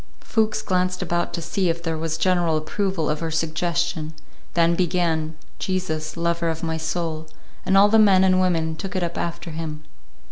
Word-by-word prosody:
Fuchs 220 -2 0
glanced 185 0 0
about 175 0 -1
to 170 - -4
see 185 +2 0
if 170 0 -2
there 165 -1 -1
was 160 0 -2
general 170 -1 +2
approval 185 +1 -1
of 150 0 0
her 165 - -2
suggestion, 165 0 -1 0.4
then 170 0 +4
began, 165 -3 0 0.2
"Jesus, 160 -4 -2
Lover 170 0 0
of 160 +1 -4
my 160 -1 -1
Soul," 160 0 -3 0.4
and 195 0 +4
all 200 +1 +8
the 220 +1 +4
men 195 -3 +6
and 185 -1 +4
women 165 -3 +1
took 195 +4 -6
it 185 - 0
up 170 0 -3
after 170 0 -4
him. 155 -1 -5
170 Hz, 180 wpm, -23 LUFS, 160-185 Hz, 0.4 s, all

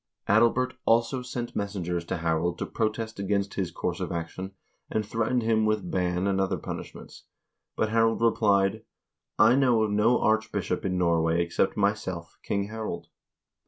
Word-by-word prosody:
Adalbert 120 +4 +3
also 115 +3 +2
sent 120 -1 -5
messengers 90 -4 -2
to 85 - -3
Harald 80 +1 0
to - - -3
protest 110 -1 -2
against 100 0 -1
his 95 -3 -2
course - - -3
of - - -3
action, 90 +3 -5 0.4
and 110 -1 -1
threatened 115 +3 0
him 110 -1 +2
with 110 -4 0
ban 90 0 0
and 95 -1 +1
other 95 - 0
punish - - -7
ments, - - -12 0.5
but 110 - 0
Harald 115 0 +2
replied: 105 -4 +2 0.3
" - - -60
I 110 +3 +6
know 125 -4 +4
of 105 - 0
no 105 +4 +3
archbishop 110 0 0
in 90 -1 0
Norway 85 -1 +2
except 85 +3 0
myself, 100 -4 -2
King 100 0 -2
Harald." 110 0 -5
105 Hz, 160 wpm, -27 LUFS, 90-115 Hz, 0.5 s, I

